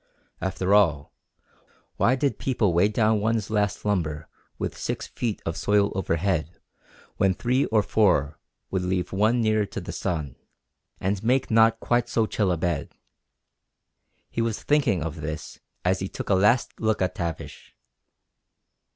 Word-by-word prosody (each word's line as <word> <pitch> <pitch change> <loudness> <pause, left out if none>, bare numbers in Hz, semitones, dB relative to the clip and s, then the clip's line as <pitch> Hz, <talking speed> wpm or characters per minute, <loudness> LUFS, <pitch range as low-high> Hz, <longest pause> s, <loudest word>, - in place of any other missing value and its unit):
After 95 0 0
all, 80 -9 +3 0.8
why 130 - +3
did 140 +1 -1
people 115 -8 +1
weigh 90 +4 +4
down 110 0 +2
one's 110 0 -1
last 105 -1 0
slumber 80 -7 -1 0.3
with - - -3
six - - -4
feet 115 -4 -4
of 80 - -2
soil 105 0 +2
overhead 85 -2 -1 0.6
when 95 -1 +2
three 125 +6 +1
or 110 -2 +2
four 90 -9 +2 0.3
would 95 - 0
leave 90 0 -2
one 110 +5 +2
nearer 110 -2 +2
to - - -6
the 85 - -7
sun, 80 -8 -3 0.6
and 95 +2 -1
make 130 +2 +1
not 115 0 +5
quite 120 0 0
so 115 -2 +2
chill 105 -3 0
a 85 - 0
bed? 80 -3 -2 1.4
He 115 - -1
was 115 -2 -2
thinking 135 - +2
of 80 0 -5
this 75 0 -6 0.3
as 95 +1 +2
he 95 - -3
took - - -7
a - - +6
last 105 +6 +2
look 110 -1 +1
at 90 0 -1
Tavish. 85 -3 -6
100 Hz, 150 wpm, -25 LUFS, 90-110 Hz, 1.4 s, a